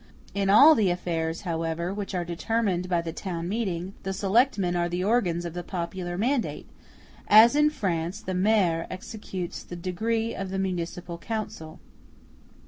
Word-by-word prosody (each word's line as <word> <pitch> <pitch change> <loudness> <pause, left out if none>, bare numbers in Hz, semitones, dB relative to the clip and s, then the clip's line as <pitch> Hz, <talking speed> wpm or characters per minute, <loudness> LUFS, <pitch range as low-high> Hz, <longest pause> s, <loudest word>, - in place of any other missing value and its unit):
In 200 -1 0
all 275 +11 +9
the 215 -9 +2
affairs, 165 -2 -2
however, 165 0 -2
which 200 -1 -4
are 175 -1 -1
determined 185 +1 -1
by 170 -2 +1
the 165 -1 -5
town 170 -2 -4
meeting, 190 -3 -2
the 195 - -3
selectmen 195 -2 +2
are 175 0 0
the 175 +1 -2
organs 185 -6 +1
of 170 - -5
the 175 - -4
popular 175 0 -4
mandate, 245 +4 -1 0.6
as 225 +5 +8
in 300 0 +5
France 180 - -2
the 190 -3 -5
Maire 185 -4 +2
executes 185 -2 -6
the 175 - -9
decree 220 +6 -1
of 195 -1 -5
the 190 - -3
municipal 175 -2 -3
council. 205 -7 -5
185 Hz, 155 wpm, -26 LUFS, 175-215 Hz, 0.6 s, all